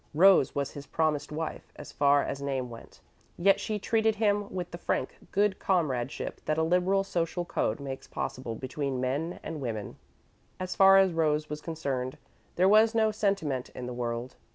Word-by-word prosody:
Rose 185 -3 +6
was 140 -1 -1
his 145 0 -9
promised 155 -3 0
wife, 160 +1 -5
as 150 - -10
far 140 0 +3
as 140 - -4
name 135 -3 -2
went, 115 - -12 0.4
yet 195 +3 +4
she 215 - -2
treated 220 +1 +1
him 205 -1 +1
with 180 -2 -4
the 170 - -7
frank 130 - -2 0.2
good 200 -1 +2
comradeship 140 -9 -1
that 155 - 0
a 160 - +2
liberal 180 +4 +2
social 175 -1 -2
code 110 - -1
makes 135 -1 -6
possible 120 -3 -4
between 130 +2 -3
men 140 +7 -2
and 155 -2 -5
women. 110 -5 -4 0.6
As 185 0 -4
far 195 0 +7
as 190 -2 +4
Rose 155 -2 +1
was 150 0 -4
concerned, 135 -6 -3 0.4
there 185 +2 +4
was 220 +3 +5
no 220 -1 +3
sentiment 195 - -1
in 125 - -5
the 125 - -5
world. 120 +1 -4
155 Hz, 175 wpm, -29 LUFS, 135-195 Hz, 0.6 s, far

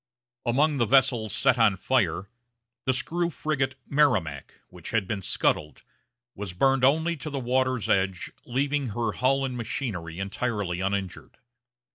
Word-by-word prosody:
Among 145 +4 +2
the 115 - +2
vessels 125 -4 +3
set 125 - +2
on 105 -4 +4
fire, 95 -4 0 0.6
the 130 - +3
screw 170 +6 -1
frigate 140 -5 -2
Merrimac, 105 - +1
which 90 -2 -10
had 110 -4 0
been 105 -1 -3
scuttled, 75 -4 -1 0.5
was 100 -3 -6
burned 135 +7 +2
only 160 +5 +3
to 155 - -6
the 140 - -4
water's 130 -2 0
edge, 95 -1 0
leaving 140 +2 -1
her 115 -2 0
hull 135 +4 +1
and 130 -2 -4
machinery 110 - -4
entirely 100 -2 -2
uninjured. 95 -1 -3
120 Hz, 140 wpm, -26 LUFS, 95-135 Hz, 0.6 s, on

